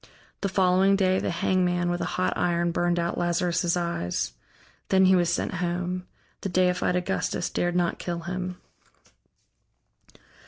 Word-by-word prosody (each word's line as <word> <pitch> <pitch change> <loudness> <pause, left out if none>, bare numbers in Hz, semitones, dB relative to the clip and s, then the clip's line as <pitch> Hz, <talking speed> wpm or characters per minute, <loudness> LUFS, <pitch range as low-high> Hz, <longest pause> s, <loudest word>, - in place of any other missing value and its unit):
The 200 - 0
following 190 +1 +3
day, 185 -1 +2
the - - -2
hangman 175 0 +1
with 175 - -2
a - - 0
hot 185 - +1
iron 175 -1 +1
burned 175 +1 +1
out 170 0 -1
Lazarus' 175 0 +1
eyes. 170 - -2 0.6
Then 190 0 +5
he 190 0 +6
was 175 -1 +2
sent 175 - -1
home. 180 +1 -2 0.3
The 195 - -3
deified 180 0 +2
Augustus 175 - -1
dared 175 0 0
not 175 -1 0
kill 170 -1 -4
him. 180 +1 -4
180 Hz, 145 wpm, -26 LUFS, 175-185 Hz, 0.6 s, he